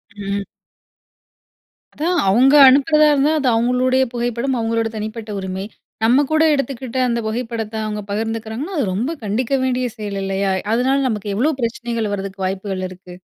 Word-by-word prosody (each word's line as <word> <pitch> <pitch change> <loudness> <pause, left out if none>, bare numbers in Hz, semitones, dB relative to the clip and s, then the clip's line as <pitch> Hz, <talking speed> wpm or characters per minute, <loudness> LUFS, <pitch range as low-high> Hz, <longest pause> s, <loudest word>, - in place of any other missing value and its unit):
ம். 200 0 -3 1.5
அதான். 345 +4 0
அவங்க 260 +8 +5
அனுப்புறதா 305 +3 +4
இருந்தா, 290 +2 +2
அது 270 - 0
அவங்களுடைய 250 +3 +2
புகைப்படம், 240 +2 -1
அவங்களோட 225 0 0
தனிப்பட்ட 215 +1 -6
உரிமை. 190 +1 -4 0.4
நம்ம 250 +6 +4
கூட 315 0 +4
எடுத்துக்கிட்ட 260 -2 -3
அந்தப் 235 -1 -1
புகைப்படத்த 225 -1 -4
அவங்க 210 -1 -3
பகிர்ந்துக்கிறாங்கன்னா, 225 - -3
அது 250 - +1
ரொம்ப 240 - -1
கண்டிக்க 225 +6 -1
வேண்டிய 255 -1 0
செயல் 205 -2 -4
இல்லையா? 195 0 -1 0.2
அதனால 260 +3 +2
நமக்கு 210 -3 -3
எவ்வளவு 275 +4 0
பிரச்சனைகள் 230 -2 -2
வரதுக்கு 195 -1 -5
வாய்ப்புகள் 190 0 -3
இருக்கு. 180 -1 -12
230 Hz, 140 wpm, -19 LUFS, 205-260 Hz, 1.5 s, அவங்க